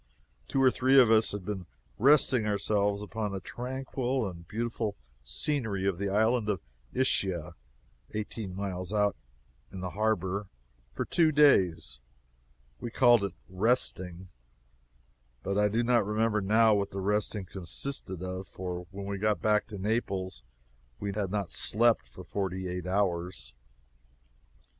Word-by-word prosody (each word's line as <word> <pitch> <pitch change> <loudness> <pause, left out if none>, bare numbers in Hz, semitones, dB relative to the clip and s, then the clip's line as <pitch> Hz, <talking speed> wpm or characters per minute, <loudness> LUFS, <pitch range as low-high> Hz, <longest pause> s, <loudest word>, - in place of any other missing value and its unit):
Two 135 - -1
or 130 - +6
three 130 +2 +5
of 120 -4 +6
us 110 0 +4
had 100 -3 -5
been 95 -3 -4 0.3
resting 130 -3 +4
ourselves 100 0 +1
among 105 -1 -3
the 95 - -3
tranquil 130 +2 -3
and 85 -3 -9
beautiful 115 -1 -2 0.3
scenery 100 - -1
of 95 -3 0
the 100 0 -1
island 110 +2 +2
of 100 -3 0 0.3
Ischia, 95 -10 0 0.6
eighteen 105 -2 -5
miles 95 -2 -4
out 105 -2 +2 0.6
in 95 - -7
the 90 -1 -4
harbor, 100 -2 0 0.4
for - - -3
two 160 -2 +3
days; 90 - +4 0.8
we 120 - -4
called 120 -2 +5
it 100 -3 -3
"resting," 95 -3 0 1.1
but 100 - -1
I 105 +1 +4
do 115 +3 +1
not 120 -1 +3
remember 105 +1 +1
now 110 +3 +4
what 100 -1 +1
the 95 - -5
resting 105 0 0
consisted 95 +1 -4
of, 95 +1 -5
for 90 -1 -6
when 100 +1 -7
we 100 0 -4
got 105 0 +1
back 105 -1 +2
to 105 - -7
Naples 95 - -2 0.6
we 100 -1 -3
had 100 -2 -2
not 100 -2 -2
slept 115 - +3
for - - -11
forty 95 -2 -3
eight 90 0 -4
hours. 90 -9 -1
100 Hz, 145 wpm, -29 LUFS, 95-110 Hz, 1.1 s, or